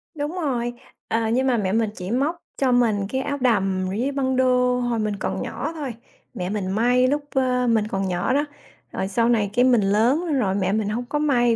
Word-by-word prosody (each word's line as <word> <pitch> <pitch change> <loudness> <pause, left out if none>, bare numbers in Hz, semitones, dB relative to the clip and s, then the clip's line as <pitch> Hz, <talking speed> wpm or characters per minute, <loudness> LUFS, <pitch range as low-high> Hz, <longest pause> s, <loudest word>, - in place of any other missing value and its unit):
Đúng 295 +1 -3
rồi, 245 -8 -1 0.3
ờ, 225 0 0
nhưng 260 +3 +1
mà 245 -2 +2
mẹ 190 -3 0
mình 220 0 +1
chỉ 185 +3 -5
móc 285 +7 +1 0.2
cho 265 -2 +2
mình 220 -5 +2
cái 265 0 -1
áo 285 +1 -2
đầm 195 -6 +1
với 240 +8 -1
băng 260 -2 0
đô 250 -1 +3
hồi 240 -2 -1
mình 210 -1 -1
còn 190 -1 -3
nhỏ 300 - -4
thôi. 280 -6 -4 0.4
Mẹ 180 0 -4
mình 195 -2 -2
may 245 +4 +3
lúc, 290 +2 0
ơ, 250 -1 +1
mình 220 -2 +2
còn 195 -2 -2
nhỏ 180 +7 0
đó, 290 +2 +2 0.5
rồi 190 - -2
sau 230 +4 +1
này 210 -4 +2
cái 245 +1 +4
mình 245 -4 +4
lớn 245 - +2
rồi 195 -4 +1
mẹ 190 -1 0
mình 215 -1 0
hông 240 +3 -3
có 295 +4 -2
may 245 -6 +3
240 Hz, 225 wpm, -23 LUFS, 205-260 Hz, 0.5 s, cái